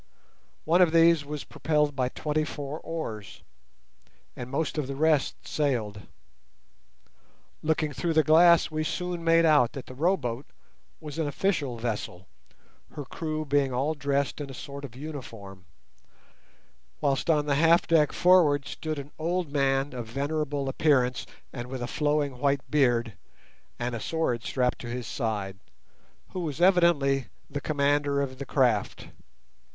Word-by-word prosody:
One 170 +3 +4
of 170 -3 +4
these 165 -2 +5
was 145 0 -6
propelled 150 0 0
by 130 -2 0
twenty 150 +3 -1
four 145 0 -6
oars, 115 - -6 0.9
and 125 0 -7
most 150 +3 -2
of 140 - -2
the 140 - -4
rest 155 -1 +1
sailed. 115 -9 -2 1.5
Looking 155 -1 0
through 170 +3 -1
the 155 0 +4
glass 170 +2 +5
we 155 0 -1
soon 180 +1 -3
made 165 0 +4
out 145 -7 +4
that 135 - -7
the - - -10
row 170 +9 +2
boat 120 0 -5 0.5
was 150 -1 -7
an 160 - 0
official 145 -6 -1
vessel, 105 -6 -4 0.7
her 145 - -6
crew 155 +2 -4
being 140 -2 +1
all 135 +5 0
dressed 140 0 -1
in 140 - -6
a 135 - -8
sort 140 +3 -8
of 125 - -12
uniform, 115 - -9 1.3
whilst 140 +1 0
on 150 -2 +3
the 145 - +1
half 165 +4 +4
deck 155 -3 +3
forward 160 -6 +4
stood 155 -1 -4
an 140 +1 -7
old 170 -1 -1
man 135 -1 +1
of 120 -3 -6
venerable 145 +2 -2
appearance, 135 -3 +1 0.3
and 120 -2 -6
with 130 -1 -5
a - - -3
flowing 145 -1 -1
white 140 0 0
beard, 120 -6 +2 0.6
and 120 +1 -3
a 115 - -3
sword 145 -5 -1
strapped 125 +5 0
to 120 - -7
his 120 0 -4
side, 105 -5 -3 0.7
who 185 - -5
was 155 -5 -4
evidently 170 -8 +3 0.2
the 145 0 -3
commander 145 -1 +1
of 130 -2 -3
the 140 - -6
craft. 120 -7 0
145 Hz, 150 wpm, -27 LUFS, 130-155 Hz, 1.5 s, these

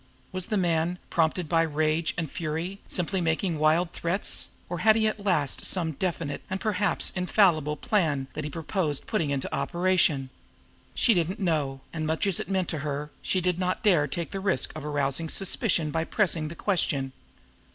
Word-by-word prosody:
Was 185 -1 -2
the 215 - 0
man, 175 -1 +1
prompted 165 +1 +1
by 165 +1 +3
rage 155 +1 0
and 160 -4 -2
fury, 165 +5 -3
simply 180 +1 0
making 165 0 0
wild 160 +3 +3
threats, 175 +4 0 0.2
or 175 -1 -4
had 220 0 +5
he 220 -1 +2
at 215 -1 -3
last 155 -9 +1
some 170 -4 0
definite 160 -2 -3
and 190 +1 -2
perhaps 205 -1 +1
infallible 180 -5 +2
plan 160 - +1
that 155 - -4
he 150 - -3
purposed 160 -1 -2
putting 170 -9 0
into 140 -2 -2
operation? 160 -3 +1 0.6
She 235 - +4
did 170 -3 +1
not 195 +4 -5
know; 150 -8 0
and, 155 -1 -2
much 160 +5 0
as 195 -4 +1
it - - -4
meant 190 -3 0
to 155 - -1
her, 145 0 -4
she 185 - 0
did 180 0 0
not 185 +3 -1
dare 175 -9 +4
take 165 +5 -3
the 195 - -3
risk 190 -9 0
of 155 - -6
arousing 145 +1 0
suspicion 180 -4 +2
by 160 +2 -1
pressing 170 -7 +1
the 165 - -7
question. 145 -10 0
165 Hz, 185 wpm, -27 LUFS, 155-185 Hz, 0.6 s, had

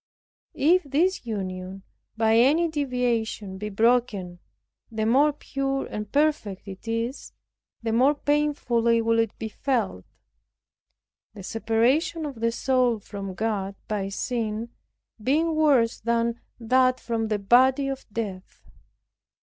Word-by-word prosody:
If 345 +6 +4
this 315 +1 0
union 190 -2 -5 0.3
by 220 0 +3
any 290 +9 +4
deviation 245 -9 -2
be 210 +1 -4
broken, 210 -5 +1 0.5
the 220 -1 -2
more 275 +7 +4
pure 275 -1 -3
and 210 -1 -6
perfect 285 -11 0
it 195 +3 -10
is, 230 +4 -3 0.5
the 225 -1 -1
more 265 +6 +4
painfully 280 -6 +1
will 230 0 +2
it 225 -2 -1
be 225 - -4
felt; 220 - -2 1.3
the 200 - -9
separation 235 - +1
of 275 -6 -6
the 230 0 +1
soul 250 -1 +1
from 200 -2 -7
God 200 -2 -2
by 200 -2 -2
sin 225 +1 -3 0.5
being 310 +8 +1
worse 280 -7 +3
than 235 +1 0 0.2
that 255 +2 +3
from 225 -2 -2
the 215 -1 0
body 260 +7 +4
of 270 -1 -5
death. 200 -4 -6
230 Hz, 125 wpm, -25 LUFS, 215-270 Hz, 1.3 s, If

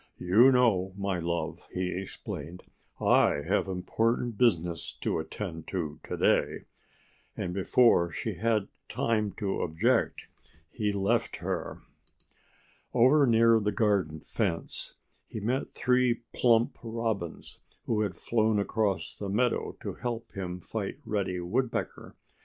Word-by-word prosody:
"You 110 +9 +5
know, 105 -7 +3
my 100 -2 -1
love," 85 0 -3
he 90 0 -2
explained, 90 -2 -6 0.4
"I 75 - +3
have - - +1
important 110 +6 0
business 85 -8 +1
to - - 0
attend 80 0 -6
to 80 -6 -3
to - - -5
day." - - +2 0.7
And 90 - -3
before 95 -1 +4
she - - -3
had 110 -3 0 0.2
time 110 -3 0
to 100 -3 -2
object 80 -1 +1 0.5
he 105 -3 -1
left 100 +4 0
her. - - -4 1.1
Over 135 +4 +5
near 115 -1 +5
the 105 -1 0
garden 100 -7 +1
fence 95 -7 -2 0.3
he - - -6
met 120 +6 -1
three 125 -2 +2
plump 115 -1 +3
Robins 115 -7 -4 0.3
who 110 -2 +1
had 95 -5 -2
flown 110 -2 +1
across 100 -4 -1
the 100 - -5
meadow 120 +4 0
to - - -3
help 120 -1 -5
him 90 -2 -5
fight 100 +3 -4
Reddy 95 -4 -1
Woodpecker. 115 +9 -2
105 Hz, 125 wpm, -29 LUFS, 90-115 Hz, 1.1 s, You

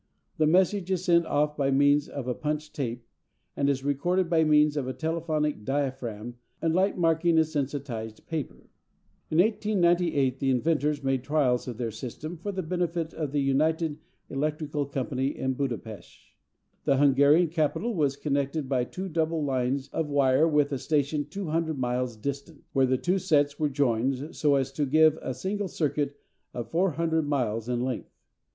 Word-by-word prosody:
The 155 - +4
message 185 +3 +2
is 185 -1 -1
sent 170 -2 +4
off 150 +1 +1
by 140 -2 +1
means 145 +1 +3
of 135 -3 -6
a 125 - 0
punched 150 +3 -3
tape, 120 -4 -4 0.5
and 140 - +1
is 135 -1 0
recorded 170 +6 0
by 160 -1 +4
means 150 -1 +4
of 140 -4 -2
a 130 - -2
telephonic 155 -5 -1
diaphragm 125 -4 -3 0.2
and 165 -1 0
light 190 +3 +2
marking 165 0 +2
a 160 - +6
sensitised 135 -7 -4
paper. 155 -4 -5 0.6
In 155 - -1
1898 175 - +2
the 135 - 0
inventors 150 +2 +1
made 135 -2 0
trials 135 -4 +1
of 120 -3 -5
their 115 -2 -2
system 130 +9 -7
for 180 +5 -5
the 190 -1 -3
benefit 170 -1 -2
of 150 -4 -3
the 145 0 +1
United 155 +3 +1 0.3
Electrical 150 0 -2
Company 135 0 -2
of 130 0 -1
Buda 130 -4 -1
Pesth. 110 -3 -13 0.5
The 135 - +3
Hungarian 145 +4 +5
capital 165 +8 0
was 145 -7 +1
connected 140 0 -1
by 130 -2 +1
two 185 +8 -6
double 160 -2 0
lines 130 0 -1
of 155 0 -2
wire 140 +1 +3
with 150 -2 +2
a 135 - -2
station 145 0 0
200 160 -3 -2
miles 125 -1 -1
distant, 140 +6 -6
where 135 -1 +3
the 130 0 +2
two 180 +7 0
sets 145 -4 +2
were 150 -1 +1
joined 135 +2 0
so 145 -3 +3
as 135 -1 0
to 145 +1 -1
give 155 +2 +4
a 130 - -4
single 200 +1 -2
circuit 145 -4 -1 0.4
of 120 -2 -5
400 165 -2 +1
miles 120 -5 -1
in 120 -1 0
length. 130 -2 -3
145 Hz, 170 wpm, -27 LUFS, 135-160 Hz, 0.6 s, a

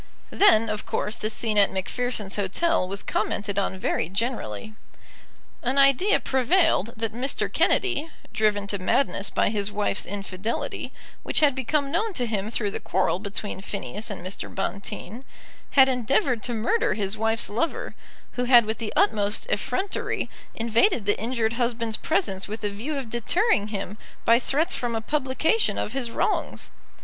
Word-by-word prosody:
Then, 230 - +5
of 215 -1 -3
course, 210 - -2
the 215 - -2
scene 220 -1 +1
at 200 - +5
Macpherson's 210 +1 -3
Hotel 205 - +1
was 195 +1 -3
commented 205 -1 -1
on 190 -1 -1
very 165 -3 -1
generally. 215 - -3 0.9
An 255 +3 -1
idea 275 +9 +5
prevailed 260 - +2
that 225 -1 -2
Mr. 255 +4 0
Kennedy, 345 -5 +2 0.2
driven 210 -2 +1
to 200 0 -1
madness 200 +1 +1
by - - +1
his 205 -1 -1
wife's 205 -1 -1
infidelity, 200 +2 -4 0.3
which - - +1
had 290 -3 +5
become 275 +2 0
known 435 +4 0
to 250 -8 0
him 215 -2 -2
through 215 -3 -1
the - - -4
quarrel 185 -1 0
between 200 -1 -5
Phineas 195 - -4
and 190 -4 -6
Mr. 185 - -5
Bonteen, 200 +4 -5 0.5
had 265 -1 +9
endeavoured 250 -1 +1
to 240 +2 -2
murder 420 - +1
his 200 -1 -1
wife's 225 +1 0
lover, 330 - -2 0.4
who 250 - -2
had 240 -2 +7
with 220 +1 -3
the 225 -2 -3
utmost 210 - +2
effrontery 390 -4 -2 0.2
invaded 230 - +2
the 205 - +2
injured 230 -1 0
husband's 235 -2 -1
presence 195 -1 -1
with 215 +1 -6
a 205 - 0
view 255 +9 -4
of 255 -5 -5
deterring 240 - +2
him 205 -1 -5 0.3
by 230 +1 +6
threats 315 +8 0
from 240 -2 -2
a - - 0
publication 295 - +1
of 215 - -2
his 260 -3 -2
wrongs. - - -1
225 Hz, 160 wpm, -25 LUFS, 205-265 Hz, 0.9 s, had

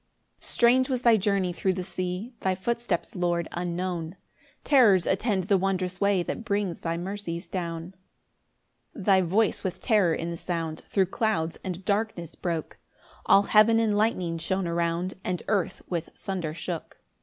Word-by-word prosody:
7 - - -9
Strange 255 +2 +4
was 255 -2 -1
thy 235 -2 +6
journey 195 -3 +1
thro' 190 +2 0
the 185 0 -3
sea, 185 +6 -4
Thy 190 -1 0
footsteps, 230 -1 -2
Lord, 175 -2 0
unknown, 175 -1 -3 0.5
Terrors 215 - +5
attend 195 0 +1
the 195 +1 +2
wondrous 185 -1 -1
way 200 -3 +3
That 230 - -4
brings 200 -6 -1
thy 165 0 -2
mercies 180 -1 -5
down. 170 -1 -4 1.0
8 200 - -6
[Thy 190 -2 +5
voice 195 +5 +1
with 185 - -3
terror 200 -9 +3
in 170 +1 -3
the 170 - -5
sound 165 -2 -3
Thro' 195 -2 +2
clouds 190 -5 -1
and 185 0 -5
darkness 200 -5 -1
broke; 165 -3 -4 0.5
All 200 - +6
heaven 215 +2 +5
in 220 -2 +2
lightning 185 -6 0
shone 190 +3 -1
around, 170 +2 -1
And 180 -1 -2
earth 200 -5 -1
with 170 -2 -3
thunder 175 -5 -4
shook. 165 0 -5
185 Hz, 160 wpm, -27 LUFS, 170-205 Hz, 1.0 s, thy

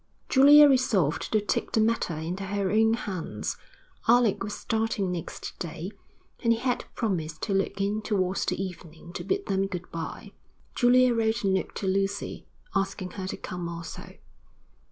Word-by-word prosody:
Julia 290 +2 +8
resolved 230 - +2
to 215 - +4
take 205 - -2
the - - +3
matter 220 -6 +1
into 175 +5 -4
her 195 -1 -1
own 220 +1 +4
hands. 180 - -4 0.5
Alec 235 -4 +4
was 205 +1 -4
starting 220 -4 -1
next 170 -2 -5
day, 170 +2 -5 0.5
and 230 -1 +4
he - - -1
had 250 +1 -1
promised 165 -8 -2
to 205 - 0
look 195 0 0
in 205 +2 0
towards 195 -3 0
the - - -1
evening 170 -3 -7
to - - -5
bid 395 +1 -1
them 195 0 0
good 180 -2 -6
bye. 165 -1 -6 0.4
Julia 250 0 +5
wrote 225 -1 +1
a - - +2
note 190 -1 0
to - - -4
Lucy, 195 +1 -1 0.3
asking 195 -2 -1
her 190 -1 -5
to - - -4
come 180 -2 -5
also. 170 -1 -8
195 Hz, 165 wpm, -27 LUFS, 180-225 Hz, 0.5 s, Julia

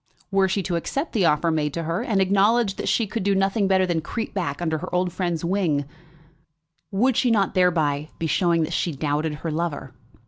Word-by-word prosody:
Were 195 -1 +3
she 195 +1 0
to 175 -1 -1
accept 275 - -3
the 205 -7 +2
offer 165 +2 +2
made 150 -2 -1
to 170 - -2
her, 165 +6 -2
and 220 -5 0
acknowledge 200 +2 +3
that - - -2
she 230 - +2
could 225 +2 -4
do 200 +1 +1
nothing 195 +1 +1
better 190 -1 +3
than 170 -3 -1
creep 225 +7 -5
back 165 -8 -2
under 160 -2 -1
her - - -6
old 180 -1 0
friend's 175 -3 -2
wing, 170 -6 0 1.0
would 240 +6 +2
she 250 - +2
not 205 -4 +2
thereby 155 -5 +1
be 165 - -3
showing 170 0 +2
that - - -3
she 170 - -1
doubted 150 +2 -1
her 160 +2 -4
lover? 155 -4 -3
180 Hz, 210 wpm, -23 LUFS, 160-195 Hz, 1.0 s, Were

